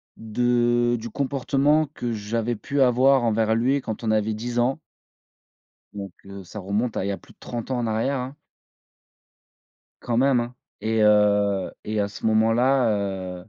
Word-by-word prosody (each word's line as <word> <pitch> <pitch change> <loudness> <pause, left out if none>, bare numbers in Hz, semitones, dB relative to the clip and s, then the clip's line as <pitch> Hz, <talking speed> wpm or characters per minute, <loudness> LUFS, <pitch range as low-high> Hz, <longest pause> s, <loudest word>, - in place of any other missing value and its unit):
de 120 +1 +1
du 115 +1 -7
comportement 140 +3 +1
que 120 -5 -4
j'avais 115 +2 -2
pu 140 +7 -3
avoir 130 +1 +4
envers 110 -1 +2
lui 130 +4 +1
quand 110 0 -5
on 110 - +1
avait 110 0 +1
10 120 +3 -5
ans 125 +5 +1 1.2
donc, 100 -3 -6
heu 100 -1 -9
ça 95 +4 -9
remonte 105 +5 -2
à, - - -1
il 100 - -2
y - - 0
a 100 - -2
plus - - -19
de - - -53
30 120 +1 -6
ans 125 - 0
en 120 - -1
arrière, 115 +5 0
hein 130 +3 -6 1.7
quand 120 - -2
même 130 +1 +4
hein, 120 +1 -5 0.3
et 110 0 0
heu 105 -2 +3
et 110 0 -1
à 100 - 0
ce 100 - -11
moment-là 115 +4 +3 0.5
heu 95 - -17
115 Hz, 175 wpm, -24 LUFS, 105-125 Hz, 1.7 s, avoir